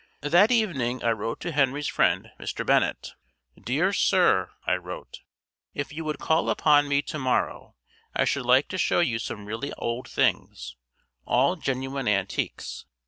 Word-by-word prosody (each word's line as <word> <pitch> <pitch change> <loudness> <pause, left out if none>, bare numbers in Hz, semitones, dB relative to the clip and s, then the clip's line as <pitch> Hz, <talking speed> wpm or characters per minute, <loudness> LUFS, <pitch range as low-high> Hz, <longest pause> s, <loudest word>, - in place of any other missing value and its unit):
That 175 +9 +4
evening 140 - 0
I 115 - +3
wrote 115 +1 -3
to 175 - -3
Henry's 145 0 +1
friend, - - +1
Mr. - - -4
Bennett. - - +1 0.5
"Dear - - +1
Sir," - - +3 0.2
I - - +2
wrote, 90 0 -6 0.6
"if 145 +1 -4
you 165 +2 -5
would 155 -2 -2
call 160 +3 +1
upon 145 -1 +4
me 145 0 +1
to 155 - -5
morrow 130 -2 -1 0.4
I - - +2
should 130 -3 -1
like 130 +3 +5
to 185 - -4
show - - +2
you 120 -9 0
some 105 -2 -6
really 110 +6 -4
old 120 +2 -4
things, 60 -1 -1 0.5
all 135 +9 +3
genuine 135 -3 -3
antiques. 100 -2 -2
135 Hz, 155 wpm, -26 LUFS, 115-150 Hz, 0.6 s, like